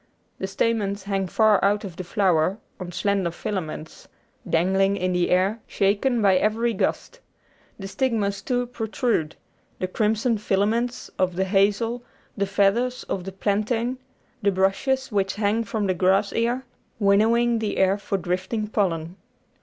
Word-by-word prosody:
The 190 - -2
stamens 200 -1 -1
hang 195 -1 -1
far 215 +1 +3
out 205 +2 +2
of 190 -5 -7
the 185 - -5
flower 185 -2 +1 0.2
on 180 -1 -6
slender 200 -1 0
filaments, 165 -3 -6 0.4
dangling 190 +4 +2
in 185 -1 -1
the 180 -1 +1
air, 190 +5 +2
shaken 215 +4 +1
by 190 -2 +5
every 225 +4 +1
gust. - - -2 0.6
The 195 - -6
stigmas, 200 -2 -1
too, 245 -1 -1
pro 240 -2 -5
trude 220 - -1 0.4
the 185 - -2
crimson 220 +3 0
filaments, 215 +5 0
of 185 -1 +1
the 190 - +1
hazel, 205 +5 +1 0.3
the 200 -1 -1
feathers 205 +6 +1
of 180 -2 -4
the 195 - -5
plantain, 225 +6 -1 0.4
the 200 - +3
brushes 250 +8 0
which 195 -2 0
hang 210 +2 +1
from 210 0 -2
the 190 - +1
grass 190 +3 +2
ear 240 +3 0 0.3
winnowing 225 +3 +3
the 215 -2 -2
air 190 +1 +3
for 200 0 -2
drifting 190 +4 -2
pollen. 175 -4 -1
200 Hz, 150 wpm, -24 LUFS, 190-225 Hz, 0.6 s, by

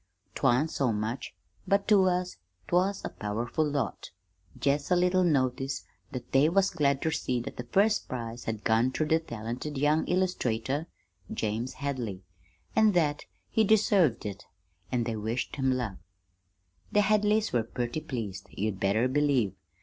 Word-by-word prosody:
'Twan't 140 +7 +2
so 130 -4 +1
much, 110 +4 -3 0.3
but 200 0 +2
to 200 -3 +6
us 180 0 0 0.3
'twas 190 +3 +1
a - - -2
powerful 115 +8 -2
lot; 140 -7 -2 0.5
jest 145 +1 +1
a 180 - +4
little 180 +1 +3
notice 135 -3 0 0.3
that 125 - -7
they 140 +3 +5
was 195 +2 +3
glad 140 -4 +1
ter 160 - +1
see 125 -4 -1
that 120 - -6
the 125 - -5
first 205 - +2
prize 120 -1 -5
had 110 -2 -3
gone 115 +3 +3
ter 155 - 0
the 160 +1 +3
talented 125 +1 -5
young 150 +3 +3
illustrator, 150 -6 0 0.4
James 110 +4 -2
Hadley, 125 -9 -4 0.5
an' 220 -1 +5
that 150 -5 +1 0.3
he 220 - +3
deserved 200 - +3
it, 100 -2 -6 0.5
an' 125 -2 +1
they 115 -1 -2
wished 110 +6 -3
him 135 -1 +2
luck. 120 -7 -2 0.9
"The 210 - +4
Hadleys 210 +1 +2
were 120 - +3
purty 120 +5 -3
pleased, 110 -10 -5
you'd 105 -2 -3
better 105 +6 +2
believe. 130 -7 +2
135 Hz, 155 wpm, -29 LUFS, 115-175 Hz, 0.9 s, to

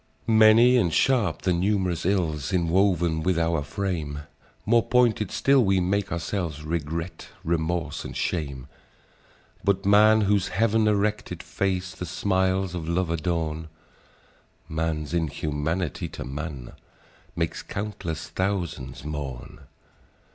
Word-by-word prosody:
"Many 110 +3 +6
and 90 -9 +2
sharp 125 +2 +2
the 95 -1 +2
num'rous 90 -1 0
ills 85 -6 0
Inwoven 85 -2 +2
with 90 +1 +1
our 85 -2 +1
frame! 75 -2 -3 0.4
More 115 +2 +4
pointed 115 -5 +2
still 135 +3 +3
we 95 -2 +3
make 100 +2 0
ourselves, 85 -3 -3
Regret, 80 +2 -4 0.2
remorse, 80 -2 -1
and - - -7
shame! 70 -7 -2 1.0
And 100 -1 +1
man, 105 +2 +6
whose 100 -1 +2
heav'n 110 +1 +2
erected 105 0 0
face 95 -1 -2
The 90 - -6
smiles 95 0 0
of 85 -2 -4
love 85 0 0
adorn,— 80 -1 -2 1.0
Man's 80 -1 -2
inhumanity 80 0 -2
to 65 - -7
man 70 -2 -6 0.6
Makes - - -2
countless 100 -6 -5
thousands 85 -9 -3
mourn! 70 -5 -6
90 Hz, 115 wpm, -25 LUFS, 80-100 Hz, 1.0 s, Many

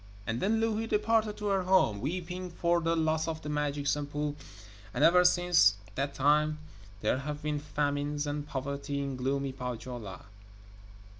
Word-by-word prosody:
And 115 +2 -2
then 220 +3 +2
Louhi 225 0 0
departed 215 0 +1
to 210 - -6
her 195 -1 +2
home, 180 - +3
weeping 180 +5 -4
for 170 0 +1
the 165 0 +1
loss 160 0 +1
of 160 -1 -4
the 150 - -5
magic 145 -1 -1
Sampo, 145 +1 -1 0.6
and 135 - +1
ever 180 +2 +7
since 175 - +5 0.2
that 140 +4 -2
time 150 +2 +3 0.4
there 110 +4 +1
have 150 +2 -5
been 150 -1 -1
famines 145 0 -1
and 145 0 -3
poverty 140 +1 -3
in 140 -1 -3
gloomy 135 +2 -1
Pohjola. 120 -5 -6
150 Hz, 155 wpm, -30 LUFS, 140-175 Hz, 0.6 s, ever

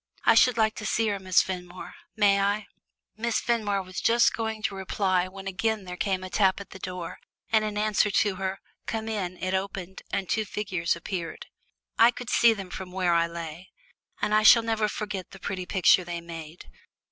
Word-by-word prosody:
I - - +7
should 250 -2 +5
like 220 -1 +3
to 210 - -5
see 225 0 +1
her, 200 -1 -2
Miss 185 -2 +3
Fenmore. 180 -1 -7 0.2
May 200 -2 +4
I?" 205 +1 0 0.5
Miss 235 +1 0
Fenmore 210 -5 0
was 185 0 -6
just 235 +1 +4
going 220 -1 -3
to 205 - 0
reply 190 -1 0
when 195 +1 -10
again 210 +2 -1
there 180 -1 -7
came 190 0 -1
a 185 - -6
tap 190 -1 +3
at 200 - -10
the 190 - -10
door, 180 -3 -6 0.3
and 220 -1 +4
in 210 -1 -3
answer 210 0 +2
to 200 0 +2
her 190 0 -3 0.3
"Come 220 -1 -3
in" 190 -5 -3
it 185 +1 -3
opened 190 -1 -4
and 195 -2 -2
two 220 - 0
figures 190 -5 -2
appeared. 170 -1 -5 0.5
I 230 - +8
could 245 -1 -5
see 235 - +6
them 195 -4 -5
from 185 0 -7
where 180 -2 +1
I 170 0 +3
lay, 170 +1 -8 0.5
and 210 - 0
I 215 - +5
shall 225 +2 +8
never 220 -2 0
forget 205 -4 -5
the 195 - -13
pretty 185 -1 -4
picture 185 -1 +4
they 175 -1 -5
made. 165 -1 -9
195 Hz, 200 wpm, -27 LUFS, 180-215 Hz, 0.5 s, I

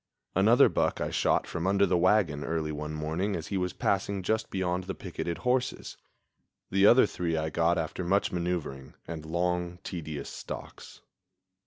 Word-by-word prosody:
Another 115 +8 +6
buck - - 0
I - - -2
shot - - +2
from 85 +2 -3
under 100 +1 +4
the 90 -1 +1
wagon 85 -5 +3
early 80 -1 -2
one 75 +1 -5
morning 80 +7 -1
as 80 - -5
he 100 - -1
was 90 -1 -1
passing 100 0 -1
just 110 +3 0
beyond 90 -1 -1
the - - -4
picketed 85 -2 -4
horses. 125 +6 -1 0.8
The 100 +1 +5
other 120 +2 +7
three 85 -5 -2
I 80 0 -2
got 85 +2 +2
after 80 +3 -3
much 95 +3 +1
maneuvering 85 -6 -3
and 80 -2 -6
long, 90 +2 -1
tedious 80 -5 -5
stalks. - - -9
90 Hz, 165 wpm, -29 LUFS, 80-95 Hz, 0.8 s, other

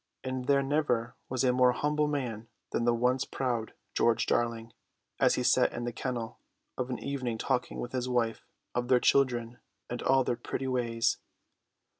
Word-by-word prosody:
And 130 -1 -3
there 140 -1 +4
never 135 -5 0
was 130 0 0
a 125 -1 +4
more 125 0 +5
humble 150 +2 +1
man 120 -7 -3 0.2
than 115 - 0
the 120 - +4
once 125 +2 +2
proud 120 -4 -2 0.2
George 115 -1 +3
Darling, 115 -1 0 0.5
as - - +4
he - - -1
sat - - +4
in 120 - -4
the 120 0 -3
kennel 120 -1 -4 0.4
of 125 0 -3
an 125 - -2
evening 130 -5 -3
talking 125 +2 -1
with 120 - -4
his 125 -1 -2
wife 115 -2 0 0.3
of 120 0 -1
their 125 -1 +5
children 120 -3 +2 0.3
and 120 - -3
all 135 0 +4
their 120 - -1
pretty 125 +2 -4
ways. 120 -3 +1
125 Hz, 175 wpm, -30 LUFS, 120-130 Hz, 0.5 s, more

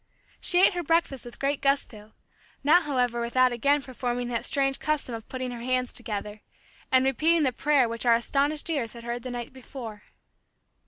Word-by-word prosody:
She 355 - +2
ate - - +4
her 355 - -2
breakfast 330 -6 +1
with 240 - -10
great 275 +1 -1
gusto, 225 -6 -1 0.5
not 325 +5 +5
however 250 -4 0
without 255 +2 +3
again 280 +4 +2
performing 245 -2 -3
that 235 -1 -1
strange 270 -1 +1
custom 305 -5 -1
of 225 -1 -8
putting 255 -1 -4
her 240 - -6
hands 255 0 0
together, 210 -2 -5 0.5
and 260 0 +5
repeating 315 +5 +3
the 260 -3 +1
prayer 280 -1 +3
which 230 0 -4
our 235 - +7
astonished 285 +6 0
ears 255 -8 -2
had 235 -1 -10
heard 240 +1 -4
the 255 - -6
night 245 0 -6
before. 240 -5 -9
255 Hz, 180 wpm, -27 LUFS, 235-280 Hz, 0.5 s, our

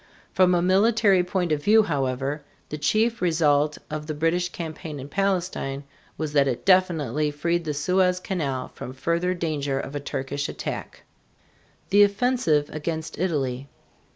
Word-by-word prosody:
From 180 -1 +4
a 175 - +1
military 195 0 +4
point 180 -2 -1
of 150 -1 0
view, 220 +1 +6
however, 140 -2 -2 0.3
the 150 - -4
chief 225 +9 +1
result 150 -4 +2
of 155 0 -4
the 155 - -3
British 165 +3 0
campaign 160 -3 -6
in 135 - -7
Palestine 180 -6 -1 0.3
was 155 -2 -3
that 140 -2 +4
it 125 -3 -3
definitely 155 -7 +2
freed 170 +3 -1
the 150 - -1
Suez 180 +4 +2
Canal 145 -9 -3
from 130 - -8
further 170 +6 -1
danger 145 -5 -2
of 135 +1 -6
a - - -1
Turkish 140 0 -4
attack. - - -6 0.9
THE 205 +1 +6
OFFENSIVE 200 - +1
AGAINST 160 +1 -4
ITALY. 140 -7 -1
160 Hz, 150 wpm, -24 LUFS, 145-185 Hz, 0.9 s, view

